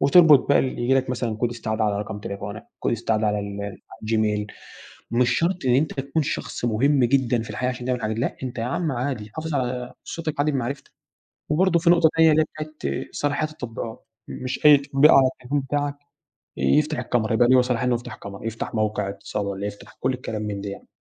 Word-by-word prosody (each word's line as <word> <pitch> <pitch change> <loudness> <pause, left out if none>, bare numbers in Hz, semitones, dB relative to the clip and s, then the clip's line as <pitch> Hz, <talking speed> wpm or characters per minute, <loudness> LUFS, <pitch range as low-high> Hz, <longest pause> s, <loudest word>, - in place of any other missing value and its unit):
وتربط 150 -2 +6
بقي 140 - +5
اللي 130 -2 -1
ييجي 130 +2 +3
لك 130 -1 +1
مثلًا 120 -3 -2
كود 120 +1 0
استعاده 110 -2 -2
على 100 -1 0
رقم 105 0 -5
تليفونك، 100 +2 -6
كود - - -1
استعاده 110 -1 0
على 105 0 +1
ال 100 0 -6 0.3
الGmail 105 -1 +1 0.7
مش 120 +1 +3
شرط 175 -3 0
إن 125 - +4
أنت 145 +3 +1
تكون 140 +3 -1
شخص 120 - -3
مهم 130 +4 +3
جدًا 120 -2 +2
في 115 - -8
الحياة 125 0 -1
عشان 125 -1 -5
تعمل 125 -1 0
الحاجه 110 -2 -2
دى، 115 - -4
لأ - - -2
أنت 125 -1 -5
ياعم 140 +7 -1
عادي، 120 -4 -3
حافظ 160 -1 -4
على 125 -1 -2
صوتك 155 -3 -5
عادي 150 +1 +2
بمعرفتك. 140 +2 -3 0.6
وبرضه 170 +2 +3
في 170 0 +2
نقطة 170 -2 +6
تانية 160 -1 +6
اللى 155 +1 +4
هى 155 0 -4
بتاعة 150 - -4
صلاحية 145 +1 -1
التطبيقات، 115 -6 -7 0.2
مش 130 +3 -5
أي 150 -1 +10
تطبيق 140 +2 +4
على 135 -1 +7
التليفون 140 +4 -2
بتاعك 145 +1 -2 0.6
يفتح 150 - +2
الكاميرا 115 -2 0
يبقى 120 +1 +4
له 130 -1 +6
صلاحيه 125 0 -1
إن - - +2
هو - - +3
يفتح 120 -2 -9
كاميرا، 100 +1 -9
يفتح 115 +1 -4
موقع 105 -2 0
اتصال 100 +1 -4
والّا 100 +1 -3
يفتح 105 0 -9
كل 130 - +1
الكلام 110 -4 -5
من 100 -2 -3
ده 100 - -5
يعني. 100 - -10
125 Hz, 210 wpm, -24 LUFS, 110-145 Hz, 0.7 s, أي